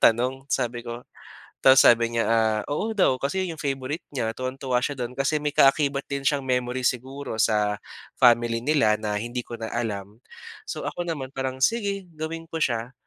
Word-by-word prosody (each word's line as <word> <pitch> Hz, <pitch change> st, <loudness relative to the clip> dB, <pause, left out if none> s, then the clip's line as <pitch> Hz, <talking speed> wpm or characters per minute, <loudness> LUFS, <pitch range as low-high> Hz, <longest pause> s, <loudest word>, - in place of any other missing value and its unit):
tanong 125 Hz, +4 st, +3 dB
sabi 120 Hz, 0 st, 0 dB
ko. 120 Hz, 0 st, -6 dB, 0.6 s
Tapos 130 Hz, 0 st, +8 dB
sabi 115 Hz, 0 st, +6 dB
niya, 115 Hz, -, +2 dB
ah, 110 Hz, -1 st, +2 dB
oo 215 Hz, +9 st, -1 dB
daw 185 Hz, -10 st, +3 dB
kasi 145 Hz, +8 st, -1 dB
'yon 170 Hz, -, -4 dB
'yong 160 Hz, -, -9 dB
favorite 140 Hz, +3 st, -3 dB
niya 115 Hz, -5 st, -2 dB
tuwang-tuwa 130 Hz, 0 st, -2 dB
siya 145 Hz, +1 st, -2 dB
do'n 125 Hz, -1 st, -4 dB
kasi 140 Hz, +4 st, 0 dB
may 150 Hz, -1 st, -2 dB
kaakibat 140 Hz, 0 st, +4 dB
din 140 Hz, -1 st, -3 dB
siyang 140 Hz, 0 st, +2 dB
memory 125 Hz, 0 st, -1 dB
siguro 130 Hz, 0 st, -2 dB
sa 105 Hz, -2 st, +2 dB, 0.4 s
family 120 Hz, 0 st, +4 dB
nila 115 Hz, -9 st, +3 dB
na 105 Hz, -1 st, -3 dB
hindi 120 Hz, +1 st, -4 dB
ko 120 Hz, -, -7 dB
na 110 Hz, -, -3 dB
alam. 105 Hz, -3 st, -4 dB, 0.5 s
So, -, -, -5 dB
ako 175 Hz, -, -5 dB
naman 145 Hz, -6 st, -4 dB
parang 130 Hz, -1 st, -4 dB
sige 200 Hz, -, 0 dB
gawin 165 Hz, +1 st, -5 dB
ko 165 Hz, -, -4 dB
siya. 120 Hz, 0 st, -1 dB
130 Hz, 185 wpm, -25 LUFS, 115-145 Hz, 0.6 s, Tapos